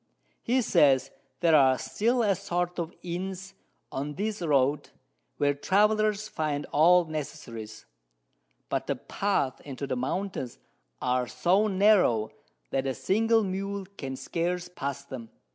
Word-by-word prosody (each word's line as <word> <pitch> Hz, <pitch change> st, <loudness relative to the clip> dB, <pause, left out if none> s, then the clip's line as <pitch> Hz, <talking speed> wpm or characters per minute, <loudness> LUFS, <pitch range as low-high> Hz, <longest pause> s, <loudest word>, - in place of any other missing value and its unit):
He 250 Hz, +2 st, +1 dB
says, 145 Hz, -, +4 dB, 0.3 s
there 165 Hz, -2 st, +5 dB
are 130 Hz, -3 st, +5 dB
still 230 Hz, -, 0 dB
a 205 Hz, -2 st, +3 dB
sort 180 Hz, -2 st, -2 dB
of 170 Hz, 0 st, -3 dB
Inns 190 Hz, +2 st, -5 dB, 0.4 s
on 145 Hz, +2 st, -4 dB
this 210 Hz, +2 st, -3 dB
Road, 145 Hz, -2 st, +2 dB, 0.5 s
where 145 Hz, 0 st, +2 dB
Travellers 210 Hz, +6 st, +2 dB
find 150 Hz, -6 st, -2 dB
all 175 Hz, +4 st, +5 dB
Necessaries; 115 Hz, -8 st, -7 dB, 0.8 s
but -, -, -2 dB
the -, -, 0 dB
Paths 195 Hz, -10 st, -1 dB
into 140 Hz, -1 st, -5 dB
the 130 Hz, -, -2 dB
Mountains 130 Hz, 0 st, -3 dB, 0.5 s
are 125 Hz, 0 st, +1 dB
so 190 Hz, -, +2 dB
narrow, 190 Hz, -, +3 dB, 0.4 s
that 135 Hz, 0 st, 0 dB
a 130 Hz, -, -1 dB
single 225 Hz, +3 st, +2 dB
Mule 195 Hz, +1 st, -3 dB
can 135 Hz, -5 st, -5 dB
scarce 175 Hz, +5 st, -2 dB
pass 140 Hz, -5 st, -5 dB
them. 125 Hz, -5 st, -8 dB
170 Hz, 130 wpm, -28 LUFS, 135-200 Hz, 0.8 s, there